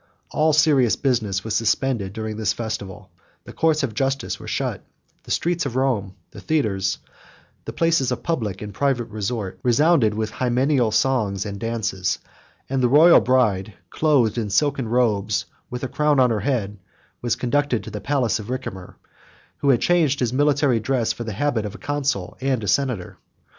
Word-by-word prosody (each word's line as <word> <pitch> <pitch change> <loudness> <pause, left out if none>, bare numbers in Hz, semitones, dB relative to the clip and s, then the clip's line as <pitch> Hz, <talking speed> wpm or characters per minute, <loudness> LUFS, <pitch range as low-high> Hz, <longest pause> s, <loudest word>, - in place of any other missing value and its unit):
All 155 +1 +2
serious 145 -6 +4
business 110 -8 0
was 110 - -3
suspended 115 -3 0
during 110 +1 -5
this 110 0 0
festival; 105 -4 -6 0.3
the - - -11
courts 155 -1 +1
of 125 -5 -2
justice 135 +4 -2
were - - -10
shut; - - -2 0.4
the - - -14
streets 175 +1 0
of 125 - -6
Rome, 120 -8 0 0.2
the - - -11
theatres, 100 -11 0 0.7
the - - -5
places 165 -6 +1
of 125 - -3
public 110 - -2
and 105 -1 -7
private 135 -5 0
resort, 105 -2 -4
resounded 125 -3 +3
with 110 0 -2
hymeneal 125 0 +1
songs 110 -4 +1
and 100 -1 -5
dances: 110 -5 -2 0.5
and 135 0 -1
the 125 - +3
royal 160 +6 +7
bride, 110 -6 +1 0.2
clothed 130 -8 +2
in 110 -3 -3
silken 135 +4 +1
robes, 105 -5 +1 0.2
with 125 +1 -6
a - - -1
crown 150 +1 +1
on 125 -2 +4
her 110 - 0
head, 105 -6 -2 0.4
was 120 -2 0
conducted 135 -1 0
to - - -8
the 105 - -6
palace 130 -6 0
of 105 - -8
Ricimer, 120 -8 -6 0.6
who 140 - 0
had 120 -3 +4
changed 160 -6 +2
his 125 -1 0
military 145 -3 +2
dress 120 0 0
for 120 - -7
the 110 - -4
habit 120 0 0
of 105 -1 -6
a - - -8
consul 140 -11 -2
and 130 -4 0
a - - -4
senator. 125 -7 -1
120 Hz, 175 wpm, -22 LUFS, 105-140 Hz, 0.7 s, royal